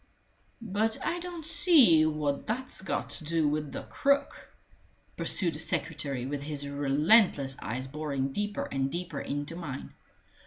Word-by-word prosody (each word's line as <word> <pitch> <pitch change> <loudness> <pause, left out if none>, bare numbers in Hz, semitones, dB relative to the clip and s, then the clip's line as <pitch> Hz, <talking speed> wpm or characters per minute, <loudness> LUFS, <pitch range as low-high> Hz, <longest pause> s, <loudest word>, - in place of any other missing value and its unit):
"But 220 +1 0
I 345 - -1
don't 345 -2 -7
see 255 - +6
what 150 -2 -2
that's 255 +1 -3
got 195 - -3
to - - +1
do 160 0 +1
with 150 0 -1
the - - -6
crook," 280 0 0 0.7
pursued 175 -4 0
the 150 - -6
secretary, 145 -5 -2
with 140 +1 -3
his 145 -1 -4
relentless 145 - +3
eyes 125 +4 -4
boring 140 -1 -3
deeper 205 +6 -2
and 135 0 0
deeper 170 -2 -4
into 145 +3 -4
mine. 150 -6 -7
155 Hz, 145 wpm, -29 LUFS, 140-205 Hz, 0.7 s, see